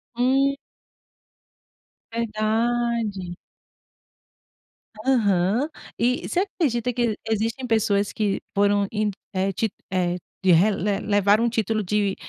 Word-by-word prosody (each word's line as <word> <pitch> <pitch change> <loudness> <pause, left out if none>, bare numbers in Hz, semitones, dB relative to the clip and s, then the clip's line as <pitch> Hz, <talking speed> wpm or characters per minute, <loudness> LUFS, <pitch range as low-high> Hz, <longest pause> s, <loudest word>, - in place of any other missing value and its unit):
Hum. 270 +3 +3 1.6
Verdade. 225 -3 -1 1.7
Aham 220 - +2 0.3
e 245 +2 +1
você 360 - +1
acredita 270 - -1
que 240 -1 +1
e - - -3
existem 225 +4 -1
pessoas 205 -3 +1
que 205 -2 -1
foram 200 0 +3
e 215 -1 0 0.2
é 190 +1 0
te 220 +4 -1 0.2
é, 180 -2 +1 0.3
re 185 +3 +5
le 200 +1 -1
le - - -8
levaram 205 +2 +4
um 235 - +2
título 220 -1 0
de, 200 0 0
215 Hz, 110 wpm, -24 LUFS, 200-235 Hz, 1.7 s, re